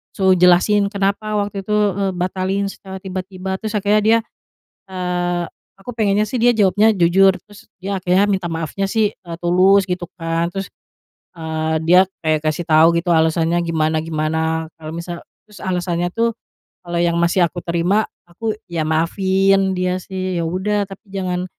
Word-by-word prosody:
suruh 190 -2 +4
jelasin 185 +3 +4
kenapa 200 +1 -1
waktu 200 -1 -2
itu, 210 +2 -1 0.2
eee, 195 0 -1
batalin 185 +2 -1
secara 190 -1 -9
tiba-tiba. 190 0 -5
Terus 220 -1 -4
akhirnya 210 +1 +2
dia, 225 +1 +5 0.7
eee, 180 -1 -2 0.3
aku 195 +6 -9
pengennya 210 -3 +1
sih 250 - -2
dia 240 0 +4
jawabnya 210 +2 +4
jujur, 190 +2 +4
terus 205 +2 -15
dia 195 +1 -2
akhirnya 185 +3 +2
minta 190 -3 0
maafnya 165 +4 -3
sih, 215 0 +1
eee, 170 -3 -9
tulus, 185 +3 +4
gitu 180 -1 -2
kan, 165 0 -1
terus, 195 0 -4 0.7
eee, 160 -1 -2
dia 180 +2 +6 0.2
kayak 155 -1 0
ngasih 155 +3 -1
tahu 155 +1 +6
gitu 175 +1 -1
alasannya 160 +1 +2
gimana-gimana, 160 0 -1
kalau 155 -1 -8
misal, 170 0 -6 0.2
terus 210 -1 -16
alasannya 175 -2 -1
tuh, 230 0 +1 0.5
kalo 175 -1 -4
yang 170 0 +2
masih 175 +1 +3
aku 175 +1 -6
terima, 175 +6 0 0.2
aku 215 +5 -4
ya 170 -2 -3
maafin 190 +4 +2
dia 185 0 -1
sih, 185 -1 -4
ya - - -2
udah, 190 +5 -1
tapi 195 +2 -12
jangan, 180 -2 -2
185 Hz, 160 wpm, -19 LUFS, 170-200 Hz, 0.7 s, dia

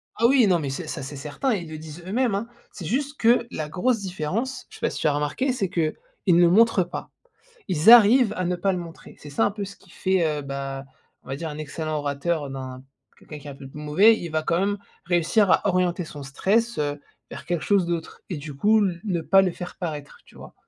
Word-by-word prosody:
Ah 230 - +1
oui, 255 -3 +5
non, 180 -3 +3
mais 145 -3 -3
c'est 135 - -5
ça, - - -5
c'est 140 +2 -7
certain. 150 - -2
Ils 175 -6 -4
le 155 - -7
disent 155 +2 -10
eux-mêmes, 230 +1 +1
hein. 210 +4 -3 0.2
C'est 180 - -9
juste 280 - -2
que 235 +1 +4
la 155 -1 -4
grosse 225 +8 +1
différence, 190 - -3
je - - -13
sais - - -13
pas - - +1
si - - -6
tu - - +2
as 150 - +3
remarqué, 150 - 0
c'est 200 -7 -1
qu'ils 165 -4 0 0.4
ne 175 0 +6
montrent 205 +1 +5
pas. 175 - -7 0.6
Ils 175 +4 +5
arrivent 235 0 +8
à 185 - -1
ne 180 +1 0
pas 195 +2 +1
le 180 - -2
montrer. 170 -2 -10
C'est 145 - -11
ça 140 - +1
un - - +2
peu 205 0 -5
ce 200 +1 -10
qui 190 - -22
fait, 185 -1 +1
heu, - - -5
bah, 135 0 -5 0.4
on - - -18
va 135 - -3
dire 160 +3 -5
un 150 -1 -7
excellent 155 +1 -4
orateur 145 +1 -2
d'un 130 -1 -7 0.4
quelqu'un 150 - -10
qui 145 - -14
est - - -6
un - - -8
peu 135 0 -11
plus 140 - -11
mauvais, 190 +10 +4
il 170 - -6
va 155 0 0
quand 170 +2 0
même 200 +2 0 0.3
réussir 175 +4 +2
à 185 - +3
orienter 180 -1 +1
son 145 -3 -9
stress, 215 +12 0
heu, 145 -1 -2 0.3
vers 150 - -8
quelque 175 -1 -1
chose 200 -4 +2
d'autre 170 -2 -4
et, 175 - -2
du 145 +1 -7
coup, 210 +8 +3
l 175 -3 -2
ne 185 -5 -1
pas 195 +4 +5
le 185 -2 0
faire 180 +1 -8
paraître, 150 -5 -6
tu - - -21
vois? - - -12
175 Hz, 250 wpm, -24 LUFS, 150-200 Hz, 0.6 s, arrivent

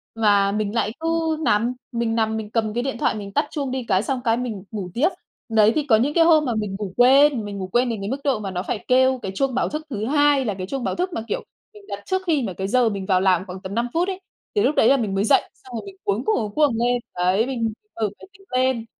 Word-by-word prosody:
Mà 205 -3 +3
mình 210 +1 -2
lại 215 -2 +1
cứ 325 -1 0
nằm, 230 +3 +2 0.2
mình 235 -2 -1
nằm 220 -1 0
mình 215 -1 -5
cầm 220 -2 0
cái 240 +1 -1
điện 270 -3 -3
thoại - - +1
mình 200 -2 -6
tắt 290 +1 +2
chuông 280 -4 -3
đi 260 -1 -2
cái, 190 -1 +2
xong 260 0 -2
cái 230 -1 +2
mình 225 -6 -4
ngủ 200 -4 -5
tiếp. 300 +10 +3 0.4
Đấy, 220 -1 +5
thì 305 - +1
có 245 -6 +4
những 260 +7 +1
cái 330 0 +5
hôm 315 -3 +5
mà 240 - -1
mình 210 -3 -2
ngủ 195 -3 -5
quên, 265 -1 +5
mình 200 -1 -6
ngủ 185 - -4
quên 240 +6 +1
đến 225 -4 -3
cái 200 - -3
mức 270 +2 -2
độ 275 -6 +1
mà 200 -2 -5
nó 180 0 -3
phải 205 - -4
kêu 260 0 +4
cái 190 - -4
chuông 270 +2 0
báo 260 - +1
thức 305 +1 -5
thứ 215 -5 -3
2 290 0 +3
là 210 - -1
cái 185 -1 -6
chuông 265 +3 -4
báo - - -1
thức 365 +1 -2
mà, 225 - -2
kiểu, - - -3 0.3
mình 415 -1 -15
đặt - - -6
trước 375 0 0
khi 300 -6 +2
mà 195 - -3
cái 190 +2 -4
giờ 245 +2 +3
mình 200 -2 -4
vào 185 -2 +2
làm 185 -1 +2
khoảng 185 0 -8
tầm 190 +2 -6
5 235 +1 0
phút 345 +3 +1
ấy, 380 -1 -3 0.4
thì 415 - +3
lúc 300 - +2
đấy - - +4
là 275 - +5
mình 210 -5 -2
mới 195 - +1
dậy, - - +5
xong 250 -2 -12
rồi 225 - -5
mình 390 -1 -10
cuống 410 - -1
cuồng, 435 - +2
cuống 210 -3 -2
cuồng 295 -5 +3
lên. 245 +1 +2 0.2
Đấy, 185 +5 +2
mình 230 -4 -2 0.2
mở - - -8 0.2
máy - - -13
tính 390 0 -20
lên, 255 -2 +1
235 Hz, 290 wpm, -22 LUFS, 205-275 Hz, 0.4 s, Đấy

